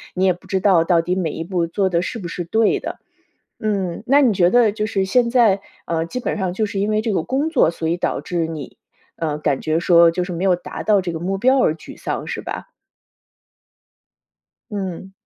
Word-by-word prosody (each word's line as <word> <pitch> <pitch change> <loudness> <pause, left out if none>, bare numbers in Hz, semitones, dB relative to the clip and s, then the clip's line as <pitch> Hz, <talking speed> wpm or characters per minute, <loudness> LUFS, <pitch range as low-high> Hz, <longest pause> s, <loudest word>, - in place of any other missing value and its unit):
你 185 +1 +1
也 185 - +4
不 175 - -17
知 190 - 0
道 185 -4 +4
到 170 0 +3
底 180 - -1
每 180 -4 -1
一 165 - -5
步 175 -1 -1
做 190 +3 0
的 170 -2 +1
是 185 - -4
不 180 - -6
是 175 +1 -4
对 220 +6 +2
的。 - - -6 0.6
嗯， 195 -5 -2
那 275 +3 +5
你 250 -7 +4
觉 175 -2 +4
得 240 -1 +5
就 215 0 -2
是 195 -3 -1
现 235 +4 +2
在， 225 -6 +4 0.3
呃， 165 -1 -1
基 210 +10 -5
本 - - -2
上 185 -3 -1
就 215 +4 -1
是 205 -2 -5
因 205 - 0
为 215 0 +2
这 220 +1 -2
个 180 - 0
工 275 - -1
作， 275 - +3
所 165 -1 -4
以 170 - +1
导 175 - -1
致 170 -2 -2
你， 155 -4 -7 0.4
呃， 155 -2 -2
感 145 -3 -1
觉 160 +1 0
说 170 -1 +6
就 180 +2 -2
是 180 - -6
没 170 +3 -3
有 185 -2 +4
达 180 - -7
到 210 -2 +3
这 180 -2 -4
个 160 - -4
目 190 +3 -2
标 260 +6 +4
而 160 - +3
沮 - - -12
丧， - - -4
是 - - -4
吧？ - - -6 2.0
嗯。 190 -2 -5
185 Hz, 250 characters per minute, -20 LUFS, 170-215 Hz, 2.0 s, 说